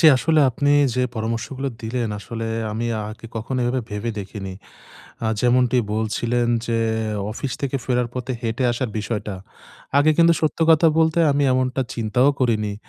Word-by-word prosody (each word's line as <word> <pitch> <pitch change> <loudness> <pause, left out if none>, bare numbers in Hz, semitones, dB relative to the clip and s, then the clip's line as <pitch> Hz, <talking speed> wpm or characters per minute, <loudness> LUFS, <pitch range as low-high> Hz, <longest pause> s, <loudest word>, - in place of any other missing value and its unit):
জ্বি 160 - +6
আসলে 155 +3 +2
আপনি 145 +4 0 0.2
যে 125 - +1
পরামর্শগুলো 115 +5 -3
দিলেন 115 0 -2
আসলে 115 +1 -5 0.3
আমি 115 +2 -2 0.2
আগে 110 +1 -10
কখনো 125 +4 -3
এভাবে 130 +1 0
ভেবে 105 +3 -3
দেখিনি। 95 -1 -6 0.7
আ - - 0
যেমনটি 125 +1 +3 0.2
বলছিলেন 115 +2 0 0.2
যে 115 -1 0 0.5
অফিস 130 +4 -4
থেকে 140 0 -1
ফেরার 125 -2 +1
পথে 125 0 -4
হেঁটে 115 +2 -2
আসার 120 0 -2
বিষয়টা। 105 -2 -3 0.6
আগে 155 +2 +5
কিন্তু 170 0 +6
সত্য 155 +1 0
কথা 160 +1 +5
বলতে 160 +1 +3
আমি 145 0 +2
এমনটা 130 +1 0
চিন্তাও 120 +4 +2
করিনি। 110 -5 +1
120 Hz, 155 wpm, -22 LUFS, 110-135 Hz, 0.7 s, জ্বি